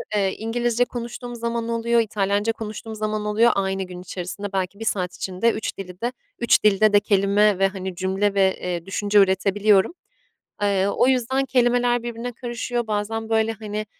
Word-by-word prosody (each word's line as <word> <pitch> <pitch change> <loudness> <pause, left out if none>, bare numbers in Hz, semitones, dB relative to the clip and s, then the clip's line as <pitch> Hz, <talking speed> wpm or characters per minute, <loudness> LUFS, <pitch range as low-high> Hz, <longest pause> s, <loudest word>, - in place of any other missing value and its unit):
eee, 195 -2 +1
İngilizce 240 +1 0
konuştuğum 240 0 -6
zaman 235 0 -3
oluyor, 235 0 +1
İtalyanca 205 0 0
konuştuğum 220 0 -7
zaman 215 0 -2
oluyor. 220 +3 +4
Aynı 195 0 -1
gün 180 -1 -9
içerisinde 185 +2 -6
belki 190 +1 -2
1 225 - -5
saat 180 -4 -1
içinde 190 +5 0
3 220 - -4
dili 180 -2 -9
de 240 +1 0 0.3
3 235 - +3
dilde 210 0 +4
de 205 - +7
kelime 200 0 +2
ve, 195 - +4
hani, 190 -1 -6
cümle 190 +2 0
ve, 190 -1 +2
eee, 175 -2 -3
düşünce 205 +1 +2
üretebiliyorum. 195 - +3 0.7
Eee, 200 -1 +2
o 200 - +2
yüzden 265 +1 +1
kelimeler 245 -2 +2
birbirine 240 +1 -5
karışıyor. 240 0 -3
Bazen, 220 +1 -2
böyle, 225 0 +2
hani, 215 -1 -5
210 Hz, 165 wpm, -23 LUFS, 195-235 Hz, 0.7 s, de